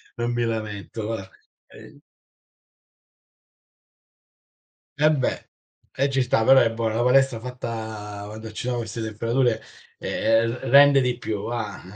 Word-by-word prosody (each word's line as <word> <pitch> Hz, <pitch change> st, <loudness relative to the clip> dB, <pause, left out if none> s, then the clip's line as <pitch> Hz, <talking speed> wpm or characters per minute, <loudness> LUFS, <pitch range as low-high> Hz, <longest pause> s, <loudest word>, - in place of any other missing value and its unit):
non 120 Hz, 0 st, -2 dB
mi 120 Hz, 0 st, 0 dB
lamento 110 Hz, -1 st, -4 dB
va. 110 Hz, -4 st, -5 dB, 0.4 s
Ehm -, -, -15 dB, 3.0 s
Eh 150 Hz, +1 st, +4 dB
beh, 135 Hz, -5 st, -2 dB, 0.5 s
eh 135 Hz, +1 st, +1 dB
ci 135 Hz, -1 st, +1 dB
sta 120 Hz, -3 st, +1 dB
però, 130 Hz, +3 st, +7 dB
eh 115 Hz, -, +2 dB
boh, 115 Hz, 0 st, -1 dB
la 110 Hz, +2 st, -1 dB
palestra 130 Hz, -1 st, +3 dB
fatta 110 Hz, -4 st, -6 dB
quando 110 Hz, +1 st, -8 dB
ci 110 Hz, -, -6 dB
sono 125 Hz, -1 st, -1 dB
queste 115 Hz, -1 st, -5 dB
temperature, 115 Hz, +2 st, 0 dB, 0.4 s
ehm, 115 Hz, +1 st, +1 dB
r -, -, -10 dB
rende 140 Hz, +1 st, +7 dB
di 125 Hz, -1 st, 0 dB
più 105 Hz, -4 st, -4 dB
va. 115 Hz, -3 st, -4 dB
115 Hz, 135 wpm, -24 LUFS, 110-125 Hz, 3.0 s, però